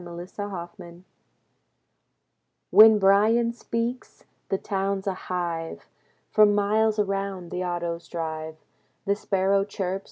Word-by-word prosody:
When 175 0 -8
Bryan - - -18
Speaks 175 -3 -8 1.7
When 220 0 +8
Bryan 215 +4 +3
speaks, 235 +1 -5 0.3
the 195 - +1
town's 195 0 -2
a 195 - 0
hive. 175 -3 -4 0.5
From 210 -1 +5
miles 215 +2 +2
around, 195 -3 -2
the 180 0 -3
autos 170 -1 -4
drive. 160 -2 -5 0.5
The 200 0 +1
sparrow 195 -1 +1
chirps. 195 -2 -3
195 Hz, 115 wpm, -25 LUFS, 175-205 Hz, 1.7 s, When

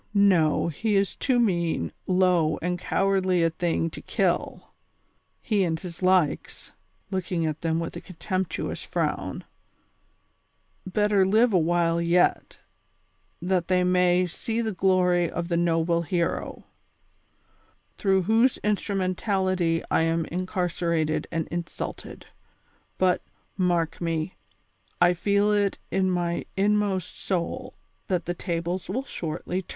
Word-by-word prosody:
no, 180 -8 +4
he 205 +7 -1
is 195 0 +1
too 255 -3 +1
mean, 170 - 0 0.2
low 180 -4 +3
and 180 +1 -2
cowardly 190 -2 +1
a 165 - +2
thing 165 0 0
to 165 - -8
kill. - - -1 0.7
He 210 -4 +1
and 160 -2 -1
his 175 -1 -8
likes 185 -5 +1 0.4
"—looking 180 -3 -1
at 155 -1 -3
them 165 -1 0
with 165 - -4
a 170 - -6
con 185 - -13
temptuous 185 +1 -3
frown—" - - -2 1.4
better 205 +1 +2
live 220 +4 +3
a 185 - +5
while 170 0 +1
yet, 170 +1 +2 0.9
that 180 -1 0
tliey 180 -1 +2
may 180 0 +3
see 225 +6 -4
the 225 -2 -1
glory 180 -2 +2
of 170 0 -4
the 170 - +1
noble 170 0 +2
hero, 170 +1 -2 1.3
through 190 -2 +2
whose 225 +6 +3
instrumen 200 -3 0
tality 185 -4 0
I - - +3
am 165 0 +1
incarcerated 170 -3 -1
and 165 -2 -2
insulted; 170 0 -6 0.7
but, 185 -1 +2 0.3
mark 175 -4 0
me, 165 0 -2 0.7
I 175 0 +5
feel 200 +3 +2
it 205 -1 +1
in 190 -1 +1
my 175 -1 -1
inmost 200 -2 0
soul 225 +8 -3 0.3
that 180 -3 -1
the 175 - -2
tables 175 +1 -3
will 250 +8 -1
shortly 175 - -4
turn. 180 - -25
180 Hz, 130 wpm, -26 LUFS, 170-195 Hz, 1.4 s, a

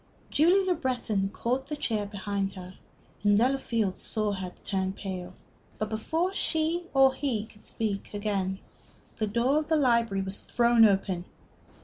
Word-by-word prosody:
Julie 360 +6 +4
Le 370 - +3
Breton 245 - -1
caught 250 +6 -2
the 300 - -3
chair 215 -7 -1
behind 200 -1 -3
her, 185 -1 -9 0.5
and 205 0 +5
Delafield 230 -5 +1
saw 215 -1 0
her 190 -2 -4
turn 190 -1 -1
pale. 185 -2 -6 0.4
But 215 - -2
before 320 - -1
she 330 -1 0
or 270 -1 +5
he 240 -8 -1
could 215 -1 -18
speak 210 -3 -3
again, 200 -2 -1 0.6
the 215 - 0
door 240 +7 +2
of 305 - -4
the 320 - +2
library 235 -8 +2
was 190 +1 -5
thrown 235 -1 +4
open. 190 -3 +1
215 Hz, 150 wpm, -28 LUFS, 195-265 Hz, 0.6 s, and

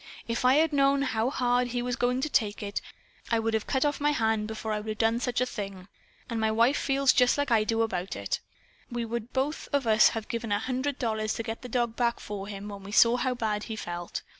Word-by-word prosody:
If 230 +1 -2
I 255 +1 +6
had 315 +1 +3
known 275 0 +3
how 230 -2 0
hard 245 -2 +1
he 245 0 -2
was 245 0 -1
going 250 +1 0
to 300 - 0
take 215 -5 0
it, 200 0 -3 0.5
I 230 - +2
would 225 0 0
of 220 -1 -1
cut 265 +1 +1
off 290 0 -1
my 295 - +3
hand 220 -4 +1
before 220 0 -4
I 210 - -1
would 215 +1 -7
of - - -16
done 225 +1 +2
such 245 0 -1
a - - +3
thing. 195 -6 -6 0.4
And 230 - -3
my 220 0 +2
wife 230 +5 +3
feels 275 -1 +3
just 250 +1 +4
like 285 -2 -1
I 220 -2 +4
do 225 +1 +1
about 190 -4 -3
it. - - -2 0.5
We 240 -2 -3
would 235 +1 -4
both 275 +4 -2
of 280 -3 +1
us 220 -1 +6
have 220 - -5
given 230 -2 -4
a 205 - +3
hundred 260 +5 -2
dollars 220 -3 -1
to 230 - -3
get 225 0 -5
the 250 - -8
dog 235 -1 0
back 235 -1 0
for 200 -1 -6
him, 205 0 -7
when 200 -1 -8
we 195 +1 -9
saw 230 +2 +6
how 255 0 0
bad 215 -3 -2
he 225 - -5
felt. 175 -4 -5
230 Hz, 255 wpm, -28 LUFS, 215-250 Hz, 0.5 s, I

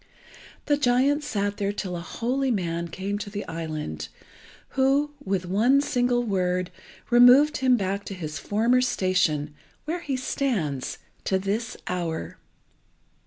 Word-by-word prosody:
The 290 -1 +2
giant 280 +2 +2
sat 205 -6 -2
there 200 -1 0
till 190 -3 -4
a - - -3
holy 255 +9 -1
man 170 -6 -1
came 195 +4 -4
to 205 - -5
the 205 0 -5
island, 155 - -4 0.6
who, 275 +2 +2
with 190 -2 -1
one 225 +9 +3
single 245 -3 +1
word, 185 -4 0 0.4
removed 250 +5 +7
him 255 -2 +3
back 200 0 -2
to 195 - -6
his 155 -4 -5
former 230 - +2
station, 185 -10 +1 0.3
where 330 +3 -2
he 280 -5 -2
stands 200 - -2 0.3
to 190 - +2
this 205 +5 -2
hour. 170 -3 -3
205 Hz, 135 wpm, -25 LUFS, 180-250 Hz, 0.6 s, removed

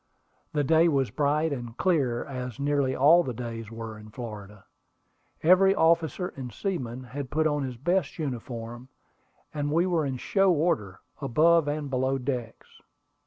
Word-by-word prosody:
The 150 -1 +1
day 160 +3 +4
was 135 -8 +1
bright 150 +3 +1
and 120 -3 -7
clear, 140 -10 +1
as 125 -4 -6
nearly 140 -2 +1
all 155 +6 +6
the 130 -8 -4
days 115 -2 -6
were 115 -1 -7
in 105 0 -12
Florida. 105 -3 -9 0.8
Every 190 +3 +6
officer 170 +2 +2
and 130 -3 -6
seaman 130 - -4
had 130 +2 -6
put 155 +2 0
on 150 -2 +1
his 130 -3 -4
best 175 +4 0
uniform, 120 -4 -5 0.6
and 145 -1 -2
we 170 +3 +3
were 175 -4 +1
in 130 -1 -3
"show" 195 +8 +2
order, 145 - 0 0.2
above 155 +4 +3
and 145 0 -2
below 130 +1 +1
decks. 125 -3 -5
135 Hz, 155 wpm, -27 LUFS, 120-160 Hz, 0.8 s, all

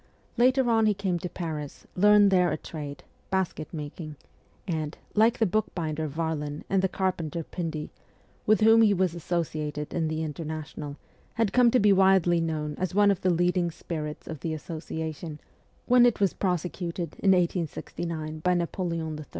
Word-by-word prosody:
Later 255 +1 +4
on 225 -2 +4
he 210 - +2
came 190 -3 -1
to 180 - -4
Paris, 155 -5 -6
learned 205 +1 +6
there 180 -3 +4
a 155 - -1
trade 145 -3 -7 0.3
basket 190 -5 -1
making 155 0 -7 0.5
and, 155 -3 -3 0.2
like 220 +2 +4
the 225 - +3
book 215 +3 +1
binder 160 -2 -2
Varlin 150 -1 -3
and 195 -1 +3
the 190 - +1
carpenter 170 -4 -2
Pindy, 160 -3 -5 0.6
with 215 -1 +4
whom 225 +1 +7
he 210 -2 +5
was 185 -2 +1
associated 155 -3 -3
in 165 -2 0
the 155 0 -2
International, 155 -1 -6 0.4
had 225 -3 +1
come 250 -1 +6
to 250 - +3
be 205 -1 +5
widely 190 -3 +4
known 155 -2 -2
as 185 0 -2
one 205 0 +5
of 195 - -2
the 185 - +2
leading 175 0 +2
spirits 155 -2 -6
of 160 -3 -6
the 160 +1 -3
Association 160 0 -6 0.5
when 245 0 +6
it 240 - 0
was 195 -2 +2
prosecuted 175 -2 -2
in 195 - +2
1869 165 -2 -2
by 180 +3 +2
Napoleon 165 -3 -2
III. 155 - -8
170 Hz, 165 wpm, -27 LUFS, 155-190 Hz, 0.6 s, whom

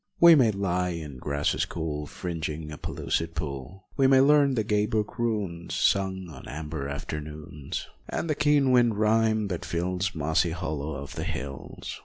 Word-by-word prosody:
We 170 0 +10
may 130 -7 +6
lie 90 -3 0
in 75 -5 -7
grasses 70 +2 0
cool 75 -3 -4
Fringing 80 -3 -4
a 75 - -7
pellucid 80 0 -2
pool, 75 +4 -5
We 135 - +5
may 135 0 +6
learn 140 0 +5
the 110 - +1
gay 105 0 +1
brook 110 +2 -2
runes 100 -8 -2
Sung 95 -1 +1
on 80 - -11
amber 75 -1 -5
afternoons, 75 0 -5 0.2
And - - -2
the 155 - +2
keen 145 -2 +3
wind 120 -4 +4
rhyme 110 0 +3
that 90 -3 -3
fills 90 +2 -1
Mossy 80 +2 +1
hollows 80 -3 -3
of - - -9
the - - -2
hills. 70 +1 -6
90 Hz, 165 wpm, -27 LUFS, 75-110 Hz, 0.2 s, We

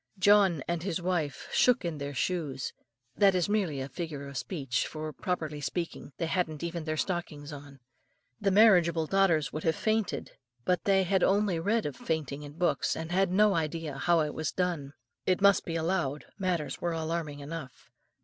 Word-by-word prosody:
John 195 -6 +5
and 170 -1 -1
his 185 -1 -2
wife 170 -5 -2
shook 250 -7 +4
in 160 -3 -3
their 140 0 -5
shoes. 145 -6 -2 0.4
That 200 -2 +5
is 180 -2 +2
merely 195 -9 0
a 130 - -4
figure 145 0 -5
of 140 - -9
speech; 135 -2 -2
for, 155 -1 -5
properly 155 -5 -3
speaking, 165 0 -4
they 165 - -1
hadn't 160 -3 -1
even 170 -1 -3
their 155 -1 -2
stockings 155 -4 -3
on. 140 -1 -11 0.6
The 200 - +2
marriageable 180 -6 +5
daughters 165 -6 +2
would 155 - -4
have 160 - +2
fainted, 220 -2 -1 0.3
but 180 -1 +1
they 195 -1 +4
had 190 +1 +1
only 195 -3 +2
read 215 +7 +1
of 145 -3 -3
fainting 150 -2 -3
in 145 -1 -9
books, 175 +3 +1
and 160 +1 -5
had 190 +1 +3
no 210 +2 +5
idea 160 -3 -2
how 170 -2 +3
it 150 -1 -1
was 155 -3 -2
done. 170 -7 -2 0.3
It 185 - +3
must 200 -1 +5
be 165 - -3
allowed 165 -4 -1
matters 180 -5 -1
were 170 -1 0
alarming 160 -2 -3
enough. 145 -2 -8
165 Hz, 180 wpm, -29 LUFS, 150-185 Hz, 0.6 s, John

